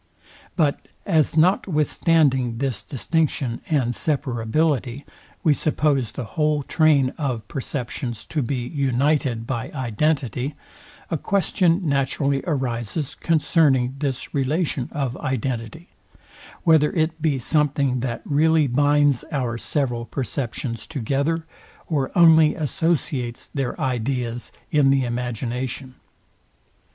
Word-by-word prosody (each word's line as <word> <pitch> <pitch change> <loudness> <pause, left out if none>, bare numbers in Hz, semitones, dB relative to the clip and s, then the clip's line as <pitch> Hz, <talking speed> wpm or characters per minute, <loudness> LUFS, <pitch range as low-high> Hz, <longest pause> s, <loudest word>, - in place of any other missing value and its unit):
But, 150 -5 0 0.2
as, 160 -4 +2
notwithstanding 155 - +2
this 130 -5 -2
distinction 140 -3 -1
and 130 -6 +1
separability, 135 0 -1 0.4
we 155 - +5
suppose 145 -6 0
the 130 - -5
whole 150 +3 0
train 145 -4 +3
of 125 -8 -2
perceptions 120 -3 -4
to 155 - -2
be 120 -1 -2
united 135 -3 0
by 130 +2 -3
identity, 130 +1 -1 0.6
a 165 - 0
question 180 -1 +1
naturally 140 0 +1
arises 130 -1 -2
concerning 145 -6 +2
this 135 -3 -3
relation 140 -1 -1
of 135 -4 -2
identity; 130 - -3 0.7
whether 160 -3 +4
it 160 -1 0
be 150 -3 +1
something 140 -1 +1
that 120 -1 -3
really 155 +1 +3
binds 145 +1 +3
our 125 -6 -1
several 120 -5 -1
perceptions 120 -1 -4
together, 145 +4 -1 0.4
or 140 -5 -1
only 160 -2 +6
associates 145 -5 -2
their 135 -4 -2
ideas 125 -1 -2 0.2
in 145 -2 +4
the 135 -1 +3
imagination. 125 +2 -4
140 Hz, 105 wpm, -23 LUFS, 125-155 Hz, 0.7 s, only